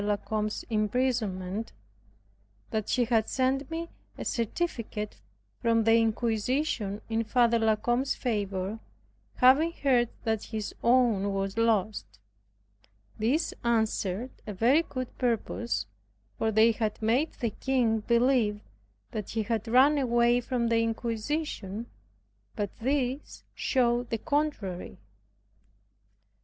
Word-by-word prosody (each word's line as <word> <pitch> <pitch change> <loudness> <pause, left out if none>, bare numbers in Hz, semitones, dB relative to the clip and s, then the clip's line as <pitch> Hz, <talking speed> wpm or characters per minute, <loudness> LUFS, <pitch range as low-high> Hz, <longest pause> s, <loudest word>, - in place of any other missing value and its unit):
La 205 0 +1
Combe's 215 0 -3
imprisonment) 215 -3 -1 1.0
that 215 -1 -2
she 245 -2 +2
had 225 -2 +1
sent 265 +2 0
me 330 +1 -4 0.3
a - - -6
certificate 230 -4 -3 0.4
from 230 -1 +2
the 225 +1 +4
inquisition 225 0 0
in 225 0 0
Father 235 0 +3
La 220 -1 +3
Combe's 240 +5 0
favor, 205 -3 -2 0.6
having 275 +6 +5
heard 255 -7 +2
that 220 -2 -1
his 215 -2 -4
own 235 -5 +3
was 195 0 -2
lost. 215 - 0 1.0
This 260 +10 +1
answered 220 -1 0 0.2
a 210 - -4
very 250 - +4
good 255 -6 -6
purpose; 115 - -1 0.5
for 220 0 0
they 220 +2 +5
had 215 -1 -2
made 240 +8 +1
the 235 -4 -2
king 240 -3 +1
believe 235 -2 +2 0.5
that 210 -3 -5
he 225 -1 -1
had 225 +1 -2
run 270 +5 +5
away 240 -1 +3
from 240 -1 -1
the 230 0 +3
inquisition; 230 -1 -3 0.7
but 205 -2 -3
this 265 +2 -2
showed 240 -2 +1
the 230 - -1
contrary. 285 - -2
230 Hz, 115 wpm, -28 LUFS, 215-255 Hz, 1.0 s, having